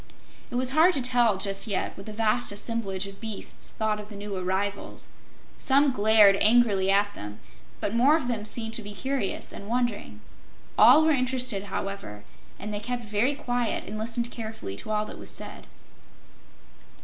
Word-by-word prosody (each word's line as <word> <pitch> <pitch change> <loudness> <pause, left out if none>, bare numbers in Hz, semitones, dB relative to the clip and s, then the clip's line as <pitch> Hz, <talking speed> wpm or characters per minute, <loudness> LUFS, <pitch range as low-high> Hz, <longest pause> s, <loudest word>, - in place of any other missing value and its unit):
It - - -7
was 255 +1 +1
hard 325 +6 +5
to - - 0
tell, 240 -4 +3
just 195 +2 0
yet, 200 -3 -2
what 195 - -11
the - - -5
vast 225 +2 0
assemblage 205 -2 -3
of 195 +1 -11
beasts 220 -3 -1
thought 215 -1 -1
of 210 0 -10
the 210 - -10
new 200 0 -6
arrivals. 190 +2 -3 0.5
Some 275 +1 +3
glared 210 -3 +5
angrily 215 -3 +4
at 205 +1 +3
them, 105 - -8 0.4
but 205 - -2
more 260 +6 +5
of 315 -6 -1
them 230 -4 -2
seemed 225 +1 -3
to 230 - -4
be 205 -1 -8
curious 265 -1 -3
and 200 - -9
wondering. 230 - -2 0.6
All 315 - +7
were 320 - +4
interested, 255 -6 0
however, 195 - -6 0.3
and 210 +1 -6
they 205 - -2
kept 240 +2 -4
very 215 +7 0
quiet 245 -5 -2
and 215 +1 -5
listened 235 +2 -2
carefully 220 - -6
to - - -9
all 215 0 0
that - - -10
was - - -6
said. - - -1
215 Hz, 175 wpm, -26 LUFS, 200-245 Hz, 0.6 s, All